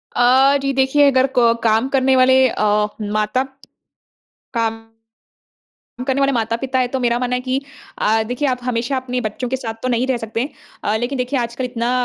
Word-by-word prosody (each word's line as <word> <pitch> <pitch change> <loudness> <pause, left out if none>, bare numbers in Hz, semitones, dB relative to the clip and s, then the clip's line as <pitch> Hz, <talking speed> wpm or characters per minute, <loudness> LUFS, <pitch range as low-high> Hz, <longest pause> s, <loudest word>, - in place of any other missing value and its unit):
अ, 265 +3 +5
जी, 275 - 0
देखिए 275 +2 +4
अगर 260 +1 +3
को 235 -1 +5
काम 225 +4 +2
करने 265 -1 +2
वाले 260 0 +5
अ, 210 -1 +1 0.2
माता 215 +4 0 1.1
काम 225 -2 -1 1.3
करने 265 0 +1
वाले 275 0 +3
माता-पिता 235 +2 -1
है, 250 - +1
तो 265 +1 -3
मेरा 240 -1 +1
मानना 250 0 -1
है 250 - -2
कि 260 +2 -1 0.4
अ, 220 +1 +2
देखिए 245 +5 -2
आप 250 -1 0
हमेशा 250 +2 -1
अपने 250 -1 -3
बच्चों 230 +3 -4
के 265 - 0
साथ 230 -4 -5
तो 255 - 0
नहीं 245 +1 0
रह 260 -2 +1
सकते। 230 +4 -3 0.3
अ, 210 - 0
लेकिन 245 +4 -3
देखिए 250 +2 -1
आजकल 240 +2 -3
इतना 240 -1 -2
250 Hz, 185 wpm, -19 LUFS, 230-265 Hz, 1.3 s, अ